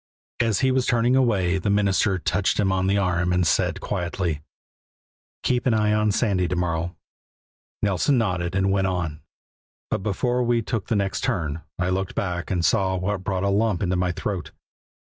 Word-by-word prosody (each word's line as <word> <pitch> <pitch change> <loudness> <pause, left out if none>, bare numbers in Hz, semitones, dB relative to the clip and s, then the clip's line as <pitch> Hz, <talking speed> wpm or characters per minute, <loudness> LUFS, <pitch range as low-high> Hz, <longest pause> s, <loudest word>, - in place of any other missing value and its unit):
As 115 -4 +1
he 130 -1 +3
was 130 -1 +1
turning 120 +1 +3
away 95 -8 +2
the 100 - -1
minister 100 -1 +2
touched 95 +3 0
him 95 -2 +2
on 95 0 +1
the 100 +1 +2
arm 90 -2 +1
and 90 0 +2
said - - +1
quietly: 85 -4 -2 1.0
"Keep 125 0 +1
an 120 - +3
eye 105 -1 +2
on 105 0 +2
Sandy 95 -5 +1
to 90 - -2
morrow." 85 0 -1 0.9
Nelson 105 +7 +2
nodded 90 -5 -1
and 95 0 +2
we - - +2
went 95 -1 +1
on; 85 -5 -3 0.7
but - - 0
before 120 +6 0
we 120 -1 +1
took 110 -2 -3
the 115 - 0
next 100 -1 -1
turn 80 -3 -1 0.2
I 90 0 0
looked 95 0 -2
back 90 -2 -2
and 90 -3 0
saw 95 -4 +2
what 95 +1 -2
brought 95 0 -1
a 100 - +2
lump 105 -1 +1
into 90 0 0
my 90 0 +1
throat. 95 +1 -4
95 Hz, 185 wpm, -24 LUFS, 90-105 Hz, 1.0 s, he